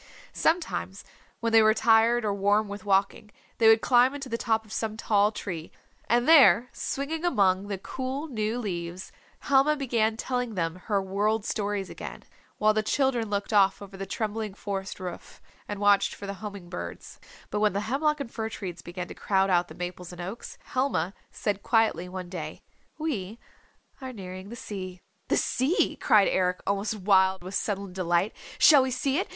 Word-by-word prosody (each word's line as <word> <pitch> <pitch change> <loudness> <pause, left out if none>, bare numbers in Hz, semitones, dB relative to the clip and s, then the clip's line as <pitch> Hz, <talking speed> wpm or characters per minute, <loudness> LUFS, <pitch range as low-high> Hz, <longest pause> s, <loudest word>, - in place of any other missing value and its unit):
Sometimes 320 - -1 0.4
when 230 -1 -1
they 225 - +8
were 215 0 +5
tired 230 +1 +4
or 205 - +1
warm 205 +2 +2
with 200 -1 -8
walking 200 +2 +1 0.3
they 225 - +5
would 220 0 +7
climb 250 +2 +4
into 275 -2 -6
the 230 - -1
top 220 -1 0
of 215 - -11
some 220 -1 -3
tall 210 -2 +2
tree, 170 -6 -6 0.4
and 240 +3 +3
there 270 -6 +7
swinging 310 +4 -3
among 200 - +2
the 200 -1 -3
cool 260 +8 -4
new 220 -4 -2
leaves, 180 -5 -5 0.3
Helma 280 +2 +3
began 230 -6 0
telling 245 -2 -2
them 165 -2 -1
her 205 -3 +2
World 205 +3 0
Stories 205 -2 -2
again, - - -8 0.3
while 215 0 +3
the 215 - +1
children 245 -1 0
looked 205 +1 -2
off 195 -2 +4
over 200 -1 -10
the 195 0 -6
trembling 215 0 -3
forest 195 -2 -5
roof 180 -2 -8 0.3
and 205 - -5
watched 205 -1 +3
for 200 - -9
homing 200 -2 -8
birds. 175 0 -8 0.3
But 210 - -1
when 210 -1 +2
the 200 - -1
hemlock 295 +7 0
and 265 -5 -5
fir 220 -1 -3
trees 180 -6 -6
began 175 0 -6
to - - -8
crowd 195 -1 +1
out 175 0 +3
the - - -12
maples 180 0 -6
and 175 - -11
oaks, 190 +7 -7
Helma 255 -9 -1 0.2
said 205 -2 -2
quietly 215 -7 +1
one 185 -1 -6
day, 175 -3 -7 0.3
"We 230 -10 -3 0.6
are 260 -1 -6
nearing 185 -2 -8
the 235 - -7
sea." 185 -5 -7 0.3
"The - - +2
sea," 285 - +1
cried 210 -2 +4
Eric 180 -1 +1
almost 200 +2 -1
wild 190 -2 +3
with 185 +2 -7
sudden 200 -2 -2
delight. 180 +2 0 0.2
"Shall 295 -4 +7
we 260 - 0
see 270 +4 0
it? - - -3
210 Hz, 180 wpm, -27 LUFS, 190-235 Hz, 0.6 s, they